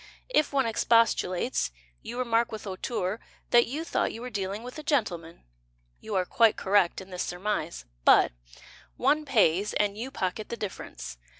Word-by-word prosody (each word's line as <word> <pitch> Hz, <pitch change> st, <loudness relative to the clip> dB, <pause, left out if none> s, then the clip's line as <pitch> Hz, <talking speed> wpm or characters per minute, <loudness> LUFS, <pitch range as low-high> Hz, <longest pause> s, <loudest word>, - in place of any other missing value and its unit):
If 310 Hz, -12 st, +2 dB
one 275 Hz, -2 st, +2 dB
expostulates, 230 Hz, -2 st, +2 dB, 0.3 s
You 240 Hz, -, -7 dB
remark 235 Hz, -2 st, +1 dB
With 220 Hz, -, -6 dB
hauteur 195 Hz, +1 st, -3 dB, 0.3 s
That 240 Hz, 0 st, +6 dB
you 295 Hz, +7 st, -3 dB
thought 335 Hz, -, 0 dB
you 225 Hz, -, -8 dB
were 250 Hz, -, -6 dB
dealing 200 Hz, +1 st, -3 dB
with 250 Hz, +5 st, -8 dB
a -, -, -8 dB
gentleman. 180 Hz, -, -1 dB, 0.6 s
You 215 Hz, -2 st, -5 dB
are 185 Hz, -1 st, +2 dB
quite 225 Hz, +3 st, +4 dB
correct 190 Hz, -2 st, +2 dB
in 190 Hz, 0 st, -13 dB
this 180 Hz, -, -4 dB
surmise. 175 Hz, -, -3 dB, 0.2 s
But -, -, +6 dB, 0.7 s
One 305 Hz, +1 st, +2 dB
pays, 205 Hz, -, +3 dB
And 205 Hz, -1 st, +1 dB
you 235 Hz, +5 st, -5 dB
pocket 210 Hz, -4 st, -3 dB
the 235 Hz, -, -4 dB
difference. 190 Hz, -, -7 dB
215 Hz, 165 wpm, -28 LUFS, 185-240 Hz, 0.7 s, That